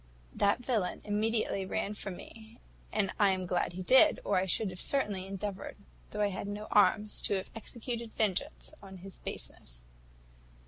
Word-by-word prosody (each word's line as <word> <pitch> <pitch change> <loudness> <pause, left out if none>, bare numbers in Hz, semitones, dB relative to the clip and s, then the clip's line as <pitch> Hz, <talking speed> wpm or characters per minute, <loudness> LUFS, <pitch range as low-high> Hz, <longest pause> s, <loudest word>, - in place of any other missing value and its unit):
That 205 +4 +2
villain 220 -8 0
immediately 210 -1 +1
ran 195 +2 -2
from 195 -3 -4
me, 220 +1 -12 0.3
and 200 -3 +2
I 205 -2 +6
am 185 -1 0
glad 175 -1 0
he 185 +1 -5
did, 265 - +7
or - - +2
I 185 +1 +2
should 190 +2 +1
have 180 - -6
certainly 205 -9 +1
endeavoured, 195 0 -5 0.3
though 210 - -3
I 205 - +3
had 195 +1 -4
no 205 +1 -4
arms, 210 0 +4
to - - +1
have 190 - -4
executed 235 +1 -5
vengeance 220 - -1
on 190 -1 -10
his 195 - -10
baseness. - - -6
205 Hz, 170 wpm, -32 LUFS, 190-220 Hz, 0.3 s, did